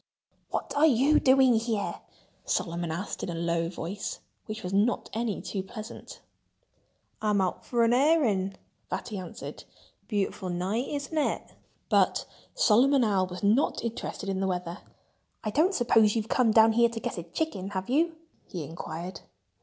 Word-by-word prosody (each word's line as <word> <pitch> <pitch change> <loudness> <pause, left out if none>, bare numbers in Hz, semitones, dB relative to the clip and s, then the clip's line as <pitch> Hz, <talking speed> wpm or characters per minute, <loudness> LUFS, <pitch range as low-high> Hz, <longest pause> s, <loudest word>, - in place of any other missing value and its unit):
"What - - -3
are 300 +2 +6
you 280 +3 +4
doing 260 -1 +5
here?" 225 -3 -2 0.4
Solomon 170 0 -1
Owl 170 +3 -2
asked 205 - -6
in - - -3
a 170 - -3
low 170 0 0
voice, 190 +3 -5 0.3
which 215 0 -6
was 180 +1 -4
not 210 +5 +1
any 225 -2 -2
too 195 - -3
pleasant. 215 +3 -9 1.0
"I'm 210 -2 +2
out 185 -2 -1
for 240 -1 +1
an 230 +1 +4
airing," 245 - +3 0.3
Fatty 195 +3 -4
answered. 185 +5 -8 0.4
"Beautiful 200 -3 -2
night—isn't 230 - -2
it?" 305 - -1 0.3
But - - +2 0.3
Solomon 270 - +5
Owl 195 -4 +2
was 180 +1 -8
not 220 +7 +2
interested 230 -3 -4
in 190 -1 -1
the 195 - 0
weather. 180 -2 -3 0.6
"I 215 - -2
don't 335 - +3
suppose 225 -5 +4
you've 220 -1 -1
come 250 -3 +3
down 220 0 +6
here 235 +1 +4
to 230 -1 -5
get 195 - -4
a - - -5
chicken, 195 - -3
have 190 -2 -4
you?" 320 +6 +2 0.3
he 175 -4 -5
inquired. 165 +3 -6
215 Hz, 160 wpm, -28 LUFS, 185-245 Hz, 1.0 s, are